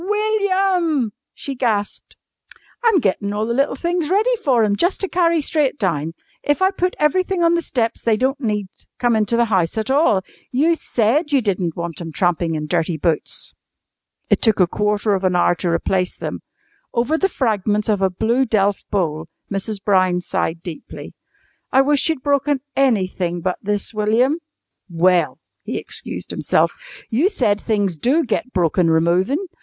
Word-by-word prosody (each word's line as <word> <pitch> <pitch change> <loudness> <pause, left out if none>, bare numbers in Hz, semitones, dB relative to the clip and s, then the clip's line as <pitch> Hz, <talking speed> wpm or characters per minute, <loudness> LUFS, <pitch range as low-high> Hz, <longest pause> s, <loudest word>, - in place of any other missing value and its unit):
"WILLIAM!" 380 - +1 0.2
she 275 - -6
gasped. 220 -5 -2 0.7
"I'm 455 -5 +4
gettin' 200 -1 -1
all 210 +1 -1
the 235 - -1
little 275 +2 +1
things 340 +1 -1
ready 420 +6 +2
for 250 -6 +3
'em 205 -1 +2
jus' 350 - +1
to 390 - -2
carry 335 -3 +2
straight 290 -1 0
down. 165 - -1 0.3
If 290 - 0
I 380 0 +3
put 365 -1 -1
everything 365 +4 +1
on 335 0 +4
the 340 - +1
steps 235 -7 -2
they 225 -2 +2
don't 270 +4 0
need 210 -4 -1 0.3
come 240 -2 +2
into 220 +2 +1
the 235 - +4
house 190 -4 0
at 220 +3 -1
all. 270 - +3 0.3
You 300 +7 +3
said 295 +1 0
you 280 - +4
didn't 185 -7 -1
want 170 0 -5
'em 165 -1 -6
trampin' 170 0 0
in 155 0 -3
dirty 160 +2 -1
boots!" 160 0 -1 0.7
It - - +2
took 220 -3 +2
a 180 - +6
quarter 210 +3 0
of 195 -1 -1
an 185 -1 +2
hour 175 - +4
to 175 - -2
replace 180 +2 0
them. - - -5 0.5
Over 240 +6 +1
the 385 +4 +1
fragments 210 - 0
of 210 -3 +1
a 190 - +3
blue 225 +8 +1
delf 205 -2 +1
bowl 160 -6 -1 0.2
Mrs. 195 +1 -4
Brown 185 -3 +3
sighed 170 -1 -2
deeply. 170 -4 -9 0.6
"I 265 - +5
wish 290 +2 +2
you'd 315 -5 -2
broken 285 -1 +1
anything 185 -9 +1
but 180 +1 -2
this, 205 +2 -2
William." 225 +8 +2 0.5
"Well," 175 +1 +2 0.2
he - - -4
excused - - -3
himself, - - +1 0.4
"you 280 - +3
said 215 - 0
things 205 -6 0
do 275 - +2
get 255 +2 -2
broken 175 -2 +2
removin'. 180 - +2
220 Hz, 170 wpm, -20 LUFS, 185-290 Hz, 0.7 s, a